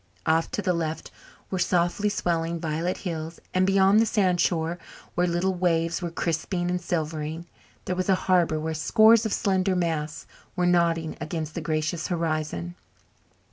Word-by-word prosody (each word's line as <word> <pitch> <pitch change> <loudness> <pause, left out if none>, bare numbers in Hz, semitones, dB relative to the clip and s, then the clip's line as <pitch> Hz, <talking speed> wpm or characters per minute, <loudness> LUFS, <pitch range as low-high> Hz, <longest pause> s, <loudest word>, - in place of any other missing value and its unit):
Off 160 +1 +2
to 205 - -3
the 180 -1 +2
left 160 -2 -3 0.4
were 190 - -1
softly 175 +3 +1
swelling 170 -3 -1
violet 165 +2 -2
hills 165 -1 -4
and 185 0 +3
beyond 195 +1 +5
the 225 - +4
sandshore, 175 -4 +1 0.3
where 180 +1 +1
little 175 +2 0
waves 170 -1 0
were 175 - -2
crisping 175 +2 -2
and 180 0 -1
silvering, 160 -1 -3 0.4
there 180 - -1
was 185 +1 -2
a 190 - +5
harbour 175 -4 +3
where 160 +1 -2
scores 220 +7 +5
of - - -6
slender 190 -2 +1
masts 160 -4 -2 0.3
were 180 - +1
nodding 170 -2 +2
against 155 -1 -4
the - - -4
gracious 155 +1 -1
horizon. 155 - -2
170 Hz, 155 wpm, -26 LUFS, 160-185 Hz, 0.4 s, beyond